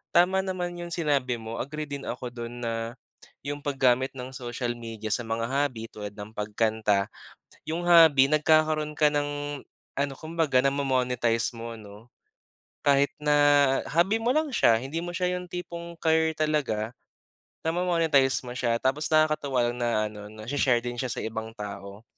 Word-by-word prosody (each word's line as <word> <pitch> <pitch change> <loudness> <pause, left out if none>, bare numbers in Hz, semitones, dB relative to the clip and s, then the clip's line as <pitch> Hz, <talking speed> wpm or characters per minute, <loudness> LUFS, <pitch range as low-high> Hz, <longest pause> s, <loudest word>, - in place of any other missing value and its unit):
Tama 185 +2 +5
naman 180 -2 -3
yung 175 0 -6
sinabi 140 -7 +1
mo 110 +1 -6
agree 150 +3 -4
din 140 -1 -6
ako 125 -1 -5
dun 120 0 -7
na, 115 +1 -3 0.5
yung 145 +1 -4
paggamit 130 -3 +2
ng 125 +1 -6
social 120 -1 -3
media 110 -2 -6
sa 120 - +1
mga 115 0 -1
hobby 130 -4 -1
tulad 105 -1 -7
ng 105 +1 -8
pagkanta, 105 -1 0 0.6
yung 165 +2 -2
hobby 160 -6 +7
nagkakaroon 155 0 +3
ka 150 -1 +5
ng 145 -1 -2 0.4
ano 140 0 0
kumbaga 160 -4 0
namo-monetize 125 -4 +1
mo 115 0 -6
ano, 105 +2 -13 0.8
kahit 140 0 +4
na 150 0 +2 0.5
hobby 175 +7 +2
mo 235 +2 +1
lang 315 0 +2
siya 115 - +4
hindi 140 +6 -4
mo 175 - -4
siya 180 0 0
yung 180 - -7
tipong 170 -1 -6
career 160 0 +3
talaga, 135 -8 0 0.8
namo-monetize 165 -6 +2
mo 120 - -5
siya 120 -2 +1
tapos 140 +4 +1
nakakatuwa 150 -5 +2
lang 120 - -8
na 120 - +1 0.2
ano 105 -1 -10
nashi 110 +6 -6
share 125 -3 +4
din 120 0 -4
siya 130 -2 -2
sa - - -3
ibang 110 0 -4
tao. 100 0 -8
135 Hz, 160 wpm, -27 LUFS, 115-155 Hz, 0.8 s, hobby